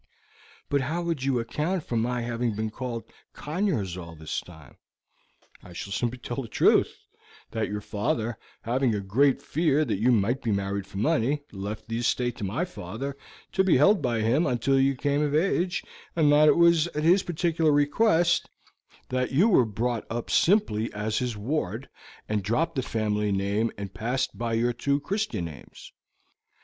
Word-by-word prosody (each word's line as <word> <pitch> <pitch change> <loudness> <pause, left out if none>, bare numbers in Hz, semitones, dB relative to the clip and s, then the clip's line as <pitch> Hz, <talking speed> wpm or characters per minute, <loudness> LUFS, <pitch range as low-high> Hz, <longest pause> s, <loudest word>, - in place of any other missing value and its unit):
"But 140 -1 +1
how 160 +7 -2
would 165 -5 -2
you 135 -2 +1
account 150 +9 -2
for 120 - -4
my 120 +2 0
having 120 -1 -2
been 110 +1 -2
called 120 0 -5 0.3
Conyers 150 - -2
all 85 -2 -8
this 80 0 -4
time?" 80 -6 -15 0.8
"I 90 - -13
should 100 +3 -6
simply 120 +3 -1
tell 120 +1 -4
the 120 - -7
truth; - - +3 0.5
that 110 -1 -2
your 105 0 -3
father, 115 +2 -2 0.2
having 125 0 +1
a - - -1
great 125 +8 +2
fear 155 -1 +1
that 110 -7 -2
you 120 +4 +3
might 120 +4 +2
be 115 - -2
married 100 0 -2
for 100 - -9
money, 120 +7 +1
left 100 +3 -6
the 115 0 -2
estate 120 0 0
to - - -6
my 115 - -1
father, 135 - -6 0.4
to 190 - +2
be 185 -7 +4
held 195 +9 +5
by 120 -3 0
him 125 +10 +2
until 130 +2 +2
you 135 +1 +3
came 145 +2 0
of 150 -1 0
age, 180 +2 +1 0.3
and 155 -3 +4
that 150 +1 +6
it - - +5
was 170 -1 +5
at 150 -3 -4
his 180 +4 +5
particular 165 -2 +1
request 170 +4 +3 0.6
that 125 0 -1
you 175 +12 +4
were 130 - +5
brought 115 +2 -2
up 115 0 -4
simply 165 - +2
as 105 +1 -1
his 125 -4 -2
ward, 115 - -3 0.4
and 105 -1 0
dropped 135 - 0
the 135 - -1
family 105 -3 -1
name 100 +3 0
and 100 -2 -6
passed 125 +4 -2
by 115 0 -2
your 120 +2 +1
two 140 +4 0
Christian 200 - -2
names. 75 -5 -11
125 Hz, 180 wpm, -26 LUFS, 110-150 Hz, 0.8 s, that